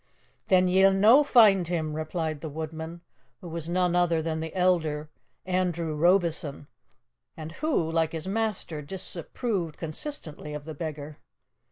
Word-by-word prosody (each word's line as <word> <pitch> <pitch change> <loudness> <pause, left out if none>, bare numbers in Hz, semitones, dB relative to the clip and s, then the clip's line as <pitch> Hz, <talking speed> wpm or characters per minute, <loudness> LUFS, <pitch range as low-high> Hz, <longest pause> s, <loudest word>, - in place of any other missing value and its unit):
"Then 185 -2 +4
ye'll 190 +1 +5
no 225 +9 +6
find 210 - +5
him," 160 -3 -2
replied 155 -1 -3
the 160 - -5
woodman, 160 +2 -6 0.4
who 180 - -10
was 165 0 -5
none 180 0 +1
other 175 -2 +2
than 160 0 -2
the 160 0 -4
elder, 160 -5 +1 0.3
Andrew 175 -3 -1
Robieson, 165 -3 +1 0.7
and 155 0 -7
who, 175 - -1
like 165 -1 0
his 160 +2 -5
master, 200 -7 -1
disapproved 180 - -3
consistently 155 - -5
of 150 - -6
the 160 +1 -7
beggar. 150 -1 -6
165 Hz, 140 wpm, -27 LUFS, 155-185 Hz, 0.7 s, no